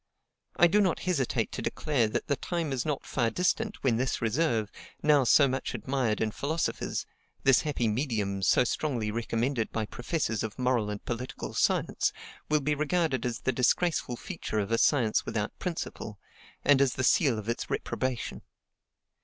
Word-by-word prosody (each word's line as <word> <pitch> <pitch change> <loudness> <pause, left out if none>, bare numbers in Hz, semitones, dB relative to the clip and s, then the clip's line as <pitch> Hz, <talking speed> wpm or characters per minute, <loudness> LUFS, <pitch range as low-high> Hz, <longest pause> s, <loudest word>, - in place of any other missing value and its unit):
I 175 - +6
do 205 +5 +4
not 185 -4 +1
hesitate 165 -9 0
to - - -4
declare 135 -7 0
that 110 - -2
the 140 - +1
time 165 -1 -2
is 125 +1 -2
not 150 -2 -2
far 120 -4 0
distant 195 - -1
when 120 -4 +2
this 125 +2 0
reserve, 115 -3 0 0.3
now 150 -2 +5
so 140 +3 +6
much 130 0 -3
admired 130 -5 -1
in 110 -1 +1
philosophers 155 +8 -2 0.4
this 135 -2 +5
happy 140 -6 -1
medium 105 -5 -1
so 95 - +4
strongly 120 -4 -1
recommended 115 +2 -1
by 110 -1 -1
professors 120 -1 -2
of 110 -2 -4
moral 125 -4 +1
and 105 -1 -6
political 125 +2 -5
science - - +1 0.4
will 150 -1 +3
be 150 +2 +1
regarded 150 -4 0
as 120 - -4
the 130 - +1
disgraceful 130 +2 +1
feature 160 - -5
of 105 0 -1
a 115 - +2
science 120 -7 +3
without 105 -1 -3
principle, 165 - -5 0.5
and 140 -1 +5
as 135 -2 +2
the 130 - -1
seal 135 - +4
of 110 0 -6
its 115 - -2
reprobation. 130 -2 -3
130 Hz, 170 wpm, -29 LUFS, 115-150 Hz, 0.5 s, I